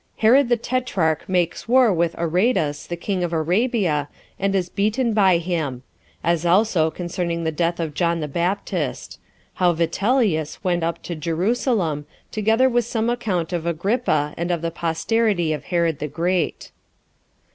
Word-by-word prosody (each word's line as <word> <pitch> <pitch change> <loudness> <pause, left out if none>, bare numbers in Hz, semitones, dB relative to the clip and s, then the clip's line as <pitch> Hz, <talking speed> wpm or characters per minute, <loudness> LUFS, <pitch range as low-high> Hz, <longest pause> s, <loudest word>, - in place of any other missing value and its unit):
Herod 245 +4 +4
The 240 - +3
Tetrarch 220 -12 -1
Makes 180 0 0
War 245 -3 +5
With 170 -1 0
Aretas, 170 -3 0
The 175 - -3
King 185 +1 -2
Of 175 -1 -2
Arabia, 170 - +1 0.3
And 195 0 0
Is 185 -2 0
Beaten 215 +5 0
By 190 -4 +4
Him 160 -7 -3 0.4
As 170 -1 +1
Also 175 -2 +3
Concerning 170 0 -3
The 160 - 0
Death 170 +2 -1
Of 160 -3 -3
John 170 +1 0
The 150 - -3
Baptist. 175 +7 -2 0.4
How 175 -1 +5
Vitellius 180 - 0
Went 175 -2 +1
Up 165 0 -2
To 175 - -5
Jerusalem; 170 - -1 0.2
Together 220 +4 +3
With 240 -2 +1
Some 230 0 -1
Account 185 -8 -2
Of 170 -1 -2
Agrippa 170 - 0
And 170 +1 -2
Of 170 -2 -1
The 165 - -1
Posterity 170 +1 0
Of 150 - -6
Herod 170 -4 0
The 150 - -3
Great. 170 +4 -1
175 Hz, 155 wpm, -22 LUFS, 165-215 Hz, 0.4 s, War